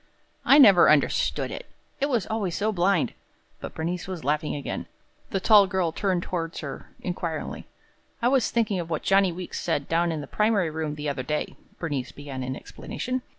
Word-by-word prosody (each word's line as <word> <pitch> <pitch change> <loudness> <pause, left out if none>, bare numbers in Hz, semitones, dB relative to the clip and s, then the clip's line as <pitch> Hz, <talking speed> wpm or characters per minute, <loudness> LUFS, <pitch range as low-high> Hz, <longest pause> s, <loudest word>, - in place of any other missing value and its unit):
"I 275 - +7
never 200 -11 +8
understood 150 -2 +2
it - - -7 0.3
it 280 - +1
was 240 -7 +1
always 205 -6 -2
so 215 +2 +1
blind!" 185 -2 +1 0.5
But - - -8
Bernice 170 +2 -3
was 185 -3 -5
laughing 150 +3 0
again. 145 - -4 0.4
The 195 - -1
tall 205 0 +6
girl 185 -4 0
turned 185 0 0
toward 165 -2 -4
her 140 -3 -7
inquiringly. 170 -3 -4 0.5
"I 235 - +2
was 260 -2 +3
thinking 215 -5 0
of 165 -1 -5
what 160 - -2
Johnny 195 -1 +4
Weeks 180 +1 -6
said 145 -4 -1
down 170 +1 +1
in 160 - -3
the 145 - -6
primary 205 -1 +1
room 155 -1 -3
the 150 0 -5
other 140 -2 -2
day," 150 +4 -3 0.2
Bernice 145 -7 -3
began 140 -2 -7
in 130 +1 -3
explanation. 255 - -5
175 Hz, 185 wpm, -26 LUFS, 150-200 Hz, 0.5 s, never